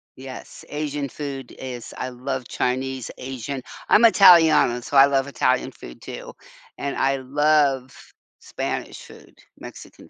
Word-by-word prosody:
Yes, 130 0 -10
Asian 145 -2 -3
food 135 -3 -7
is 125 -3 -7
I 130 - -4
love 130 0 -5
Chinese, 130 0 -2
Asian 130 +1 -6 0.3
I'm 230 - +6
Italiano, 165 - +6
so 140 - -6
I 135 - +9
love 135 -1 0
Italian 140 - 0
food - - -13
too, - - -8 0.4
and 140 - -4
I 135 0 +1
love 140 -1 +1 0.5
Spanish - - -5
food, - - -16 0.2
Mexican - - -12
135 Hz, 130 wpm, -23 LUFS, 130-145 Hz, 0.5 s, I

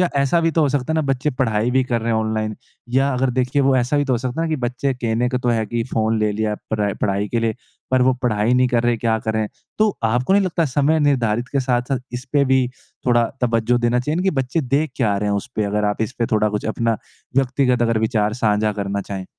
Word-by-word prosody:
या 180 - +3
ऐसा 140 +5 +2
भी 165 0 +2
तो 165 - +1
हो 145 - +3
सकता 140 +1 -1
है - - 0
ना 160 - +2
बच्चे 135 +2 0
पढ़ाई 120 -4 0
भी 130 +1 +3
कर 120 -2 -1
रहे 115 +1 -1
हैं 110 - +2
ऑनलाइन 110 -1 -2 0.4
या 135 +2 +2
अगर 130 +1 +1
देखिए, 130 +3 +1
वो 135 -1 +3
ऐसा 125 +3 +1
भी 145 - +2
तो 135 - 0
हो - - 0
सकता 125 +5 -3
है 165 - 0
ना - - -3
कि 155 - +1
बच्चे 125 +3 -1
कहने 120 0 0
को 125 0 -1
तो 125 - -2
है 115 -2 +1
कि 120 +1 -2
फ़ोन 110 0 +1
ले 105 0 +1
लिया 105 0 -1 0.2
परै 105 -2 0
पढ़ाई 100 0 0
के 115 - -1
लिए, 115 -1 0 0.4
पर 130 -1 +3
वो 130 0 +3
पढ़ाई 110 0 +2
नहीं 125 0 +4
कर 120 -2 +1
रहे, 120 -1 +2
क्या 110 0 0
करें? 110 0 -1 0.3
तो 215 0 +4
आपको 125 +8 +1
नहीं 200 +1 +5
लगता 170 -2 0
समय 145 +3 +2
निर्धारित 125 -5 +1
के 140 - +2
साथ-साथ 125 +1 0
इसपे 135 +3 0
भी 130 -1 +3 0.4
थोड़ा 120 -1 +4 0.2
तवज्जो 120 0 +2
देना 120 +1 +1
चाहिए 150 +5 -2
ना 180 - 0
कि 190 - +2
बच्चे 130 +5 -1
देख 140 +3 0
क्या 105 -6 +1
रहे 105 +1 -1
हैं 100 - +1
उसपे? 110 +1 -3
अगर 105 +1 -1
आप 105 +1 0
इसपे 115 +1 -2
थोड़ा 110 0 +3
कुछ 105 0 -3
अपना 115 -2 0 0.4
व्यक्तिगत 130 -2 +2
अगर 115 -1 +2
विचार 110 -1 +1
साझा 105 0 +2
करना 100 -1 -3
चाहें। 100 -1 -6
120 Hz, 255 wpm, -20 LUFS, 110-135 Hz, 0.4 s, नहीं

